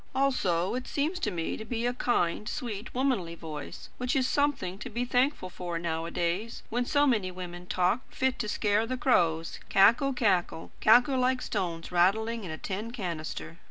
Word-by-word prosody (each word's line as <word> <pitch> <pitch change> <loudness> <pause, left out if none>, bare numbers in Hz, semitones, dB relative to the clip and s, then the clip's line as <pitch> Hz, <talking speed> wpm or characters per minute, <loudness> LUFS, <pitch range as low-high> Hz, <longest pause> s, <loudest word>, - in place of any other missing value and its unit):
Also 195 -11 +1
it 255 +1 -3
seems 315 +6 -1
to 330 - 0
me 170 -4 -2
to - - -7
be 230 +1 -3
a 245 - +1
kind, 215 -4 0
sweet, 220 -3 -5
womanly 245 -11 0
voice, 155 -3 -8
which 250 +3 0
is 260 -2 +3
something 275 -12 0
to 250 - -6
be 240 +2 -2
thankful 250 -3 +1
for 175 -1 -5
nowadays, 170 +5 -2
when 245 +2 0
so 285 +2 +3
many 215 -9 +2
women 180 -1 -8
talk, 185 +8 +1
fit 260 0 0
to 215 - -2
scare 210 +2 +1
the 255 +1 -2
crows; 165 - +2
cackle, 235 +8 +5
cackle, 190 -9 0
cackle 245 +4 +5
like 255 0 +2
stones 170 -8 -3
rattling 220 +6 +2
in 180 - -6
a 155 - -4
tin 205 +6 -4
canister." 170 -7 -5
215 Hz, 175 wpm, -29 LUFS, 175-250 Hz, -, cackle